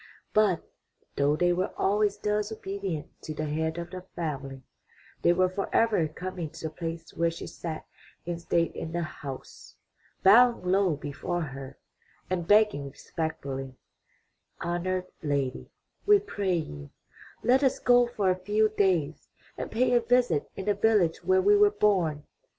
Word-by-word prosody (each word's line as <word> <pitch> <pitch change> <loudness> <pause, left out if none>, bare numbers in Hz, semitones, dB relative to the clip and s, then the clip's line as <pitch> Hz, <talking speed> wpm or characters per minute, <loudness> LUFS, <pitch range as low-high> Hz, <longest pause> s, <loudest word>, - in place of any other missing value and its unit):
But, 210 -5 +3 0.5
though 145 +1 +2
they 175 +2 +2
were 185 +2 -1
always 205 +1 +2
thus 210 +1 -1
obedient 195 -7 -5
to 155 - -6
the 155 - -2
head 160 +2 -2
of 170 0 -6
the 185 -1 -6
family, 135 -5 -4 0.6
they - - +5
were 185 +1 +3
forever 195 -1 +1
coming 175 +1 -5
to 165 +2 -12
the - - -20
place 165 0 -6
where 170 0 +1
she 165 - -7
sat 160 -2 -6 0.4
in 170 -1 -3
state 170 0 0
in 165 - -6
the 170 0 -1
house, 140 -4 -9 0.5
bowing 235 +3 +6
low 185 -2 +2
before 150 +4 -4
her 135 -3 -7 0.5
and 175 -2 -1
begging 205 -10 +4
respectfully: 135 -4 -5 0.9
''Honored 180 +1 -1 0.2
lady, 140 -4 -2 0.4
we 415 0 +8
pray 200 - -1
you, 75 - -5 0.5
let 255 +4 +4
us 265 - +3
go 245 0 +4
for 205 -6 +1
a - - +1
few 215 +2 +2
days 190 -8 0 0.3
and - - -5
pay 245 +2 +2
a 240 - +5
visit 245 - +2
in 190 - -6
the 205 - +3
village 200 -5 +2
where 375 0 +3
we 410 +1 +6
were 415 0 +6
born.'' 185 - +1
180 Hz, 155 wpm, -28 LUFS, 155-210 Hz, 0.9 s, we